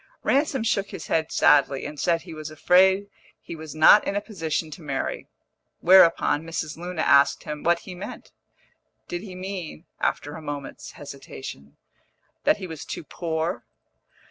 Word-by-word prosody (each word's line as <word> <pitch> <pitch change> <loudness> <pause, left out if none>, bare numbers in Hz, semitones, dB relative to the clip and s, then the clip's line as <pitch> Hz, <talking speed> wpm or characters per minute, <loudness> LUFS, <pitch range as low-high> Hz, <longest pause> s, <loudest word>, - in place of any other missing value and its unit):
Ransom 275 -3 +1
shook 200 -3 0
his 190 -6 -7
head 160 -1 0
sadly, 140 -2 +3
and 150 0 -7
said 170 -2 +1
he 170 -2 -10
was 155 -1 -7
afraid 190 +5 +4 0.4
he - - -7
was 155 -1 -9
not 155 +7 +7
in 200 - -1
a - - +2
position 165 -7 -3
to 170 - -9
marry; 140 -3 -3 0.5
whereupon 170 -4 +5
Mrs. 160 -2 -4
Luna 175 -1 -4
asked 140 0 +4
him 150 0 -6
what 170 0 +2
he 185 - -9
meant 180 +3 -9 0.8
did 175 0 -4
he 190 -3 -9
mean 185 -3 -6
(after 145 - -1
a 160 - -8
moment's 140 -6 -7
hesitation) 135 - -10 0.7
that - - +4
he - - -6
was 160 -4 -7
too - - -6
poor? 165 +2 -3
165 Hz, 160 wpm, -25 LUFS, 150-185 Hz, 0.8 s, not